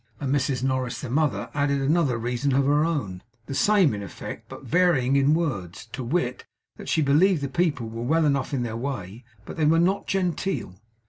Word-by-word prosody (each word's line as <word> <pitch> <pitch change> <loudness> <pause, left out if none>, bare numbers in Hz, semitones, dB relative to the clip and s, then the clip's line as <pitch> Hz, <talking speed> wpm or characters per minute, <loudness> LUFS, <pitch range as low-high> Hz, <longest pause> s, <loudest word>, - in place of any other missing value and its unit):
Mrs 135 -2 0
Norris 130 -1 -1
the 130 - -6
mother 140 -8 0
added 140 -1 +1
another 140 -2 +2
reason 125 +4 -1
of 140 0 +3
her 145 +2 +3
own, 135 - -2 0.2
the 135 - -6
same 190 - +3
in 100 - -4
effect, 100 - -8
but - - -10
varying 155 -7 +2
in 140 +2 +4
words; 120 - -3
to 130 - -4
wit, 125 -1 -1 0.3
that - - -8
she 160 - +2
believed 155 +3 +3
the - - 0
people 150 -7 0
were 115 +1 -6
well 160 +6 +2
enough 140 -3 0
in 135 -4 -1
their 115 -2 -4
way, 115 -4 -5 0.2
but - - -8
they 155 - +2
were 160 +2 +4
not 185 +4 +1
genteel. 180 - -2
140 Hz, 195 wpm, -25 LUFS, 125-160 Hz, 0.3 s, in